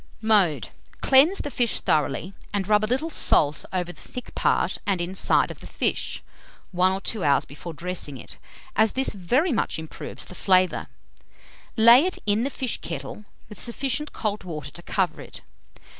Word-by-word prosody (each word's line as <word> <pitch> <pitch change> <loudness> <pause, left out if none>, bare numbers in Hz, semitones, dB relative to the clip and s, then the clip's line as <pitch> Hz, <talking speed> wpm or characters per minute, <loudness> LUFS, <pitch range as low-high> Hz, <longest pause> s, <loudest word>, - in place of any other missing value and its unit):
Mode. 195 - +2 0.3
Cleanse 285 +9 +6
the 290 - -4
fish 240 -3 +2
thoroughly, 150 +5 0 0.2
and 200 -2 -2
rub 210 0 +3
a 215 - -1
little 270 +7 -1
salt 150 - +2
over 180 -1 -2
the - - -16
thick 250 - -9
part - - +1
and 195 -3 +1
inside 180 +2 +2
of - - -11
the - - -11
fish, - - -2 0.5
1 185 0 +3
or 190 - -2
2 210 -1 -1
hours 140 -2 +3
before 150 +4 -9
dressing 165 -4 -4
it, - - -7 0.4
as 220 0 +3
this 265 +1 +1
very 245 - +1
much 230 - -1
improves 160 -1 -7
the - - -11
flavour. 185 0 +2 0.9
Lay 235 +5 +8
it 370 +1 0
in 210 +1 +2
the 265 - 0
fish 260 -4 -3
kettle, 210 - -6 0.2
with 210 - -11
sufficient 270 +4 -2
cold 210 -2 -3
water 150 -5 -6
to 150 - -11
cover 185 +1 -1
it. - - -9
200 Hz, 175 wpm, -24 LUFS, 175-240 Hz, 0.9 s, Lay